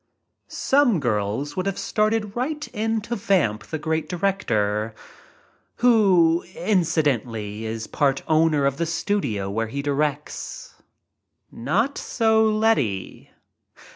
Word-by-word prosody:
Some 265 - +2
girls 115 +3 -1
would 185 +1 -2
have 195 - -2
started 215 -1 0
right 295 +5 -2
in 220 +1 -1
to 235 +3 -4
vamp 175 - 0
great 160 0 -1
director 115 - -1 0.4
— - - -35
who, 190 -9 +4
incidentally, 120 - 0
is 110 0 -4
part 140 -2 0
owner 155 -2 +3
of 140 0 0
the 170 - -1
studio 170 - -1
where 115 +2 -1
he 140 +5 -4
directs. 145 +1 -3 0.8
Not 205 - -1
so, 220 -1 +2
Letty. 215 - 0
160 Hz, 110 wpm, -23 LUFS, -, 0.8 s, who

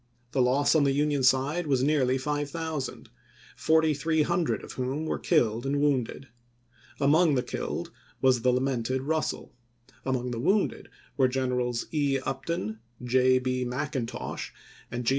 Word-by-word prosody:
The 135 - +1
loss 130 +3 +3
on 155 -3 +4
the 140 -1 +2
Union 145 0 +1
side 135 +6 +2
was 130 -3 +2
nearly 135 -3 +2
5000,4300 155 +2 -1
of - - -8
whom 135 +5 -3
were - - -2
killed 120 -9 +2
and 140 +1 0
wounded. 135 -2 0 0.7
Among 150 +2 +4
the 125 - +1
killed - - -4 0.3
was 130 -2 +3
the 125 - +3
lamented 130 0 0
Russell; 155 +2 -2 0.5
among 125 -2 -1
the 115 - -3
wounded 190 - 0 0.3
were 130 -2 +5
Gen 130 0 -1
erals 125 -1 -1
E. 145 -3 +2
Upton, 130 -5 -3 0.2
J. 130 +1 +4
B. 130 0 -1
Mcintosh, 125 0 -4 0.4
and 120 0 -4
G. - - +3
135 Hz, 140 wpm, -27 LUFS, 125-150 Hz, 0.7 s, were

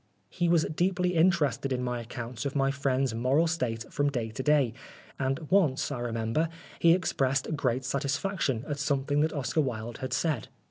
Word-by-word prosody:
He 175 -1 0
was 170 -2 +4
deeply 180 +3 0
interested 150 -6 +2
in 125 -1 -1
my 125 -1 -2
accounts 120 +1 -6
of 140 0 -3
my 135 -1 +2
friend's 135 -2 0
moral 130 +8 +2
state 125 -9 -1
from 145 0 +2
day 120 -5 -3
to 110 - -4
day, 140 -4 +3 0.5
and 135 0 0
once, 160 -9 +3
I 135 - -3
remember, 115 +6 -1 0.3
he 165 0 +6
expressed 135 -5 0
great 130 -2 0
satisfaction 140 - -1
at 145 -1 -3
something 145 0 0
that 160 +1 +2
Oscar 150 +2 0
Wilde 120 -4 -4
had 130 0 -4
said. 150 -8 0
135 Hz, 175 wpm, -29 LUFS, 125-155 Hz, 0.5 s, he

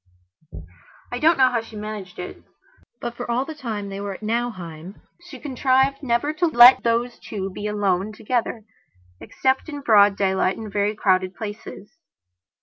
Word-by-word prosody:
I 245 - -3
don't 320 +4 +4
know 260 -1 +5
how 235 -2 0
she 225 -1 -13
managed 210 -3 -7
it, 180 - -8 0.6
but, 240 0 -5
for 245 0 -6
all 245 +3 0
the 315 - -7
time 220 -9 -5
they 195 0 -6
were 200 -1 -4
at 215 - -13
Nauheim, 195 -7 -4 0.3
she - - -10
contrived 270 0 +1
never 265 +3 0
to 340 +3 +1
let 250 -4 +8
those 235 +1 -1
two 195 -2 -5
be 205 +3 -5
alone 205 -1 0
together, 225 +1 -2 0.6
except 265 +4 -1
in 290 -2 -6
broad 205 -5 +5
daylight, 190 -1 +1
in 220 -2 -7
very 205 +1 0
crowded 185 -2 +1
places. 210 +5 -9
220 Hz, 160 wpm, -22 LUFS, 200-255 Hz, 0.6 s, let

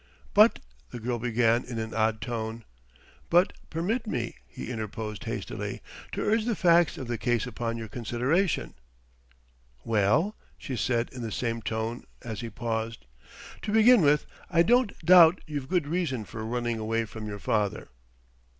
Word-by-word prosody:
"But 215 +3 +6 0.2
" - - -33
the 120 - -7
girl 120 +1 -2
began 115 0 +2
in 120 -2 -6
an 110 0 -4
odd 110 -1 +1
tone. 115 +1 -4 0.7
"But 175 +3 +4 0.2
permit 205 +10 -1
me," 120 - -2
he - - -7
interposed 110 -2 -5
hastily, - - -4 0.3
"to - - -2
urge 220 +1 +2
the 235 -2 0
facts 170 -3 +4
of 130 - -6
the 120 -2 -3
case 120 -1 +1
upon 115 -1 -3
your 115 -1 -6
consideration." 125 - 0 1.1
"Well?" 115 - +2 0.2
she 130 - -5
said 120 -1 0
in 125 - -8
the 115 -2 -4
same 115 +1 -2
tone, 110 +2 -3 0.2
as 115 -1 -5
he 115 - -5
paused. 115 - -4 0.6
"To - - -3
begin 220 +1 +6
with 150 -1 +3 0.2
I 170 - +4
don't 240 +1 +3
doubt 175 0 +8
you've 145 -3 -5
good 180 -5 +1
reason 145 -8 -1
for 110 +2 -7
running 120 0 -2
away 115 +1 -1
from 110 0 -8
your 105 -1 -5
father." 105 -1 -1
120 Hz, 160 wpm, -28 LUFS, 110-165 Hz, 1.1 s, doubt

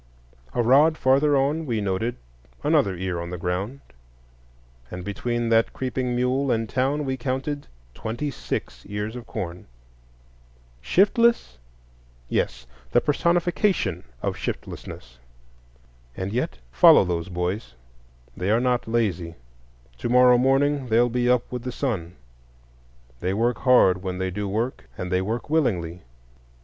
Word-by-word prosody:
A 120 - +2
rod 145 +7 +5
farther 140 +2 +3
on 145 +4 0
we 115 -3 0
noted 100 +4 -1 0.5
another 95 -2 +2
ear 90 -1 -3
on 85 - -6
the 90 - -5
ground; 95 +10 -3 1.1
and 90 0 -7
between 120 +3 -2
that 115 0 +3
creeping 125 -1 -2
mule 130 +3 +1
and 115 -2 +1
town 135 +5 0
we 130 -1 -1
counted 135 +3 -3 0.3
twenty 120 - -4
six - - -5
ears 105 +3 -4
of 120 -2 -8
corn. 90 -1 -6 1.1
Shiftless? 205 - +2 0.7
Yes, - - -1 0.3
the - - +5
personification 170 - +1 0.2
of - - -1
shiftlessness. - - -7 1.0
And 95 +2 -3
yet 125 +8 -2
follow 65 - +7
those 85 0 -2
boys: 90 - -3 0.6
they 90 +2 -2
are 110 +2 +4
not 125 -1 0
lazy; 95 -8 -1 0.6
to - - -2
morrow 125 0 +6
morning 135 +1 +2
they'll 120 +2 +3
be 120 +1 0
up 125 -1 +3
with 125 -1 -4
the 125 +1 -4
sun; 95 - -3 1.0
they 95 +6 -1
work 120 +3 +1
hard 110 -8 +5
when 90 -1 -4
they 95 0 -2
do 100 +2 -3
work, 115 +6 -2
and 90 0 -4
they 90 0 +2
work 110 +5 -3
willingly. 90 - 0
120 Hz, 135 wpm, -24 LUFS, 95-130 Hz, 1.1 s, follow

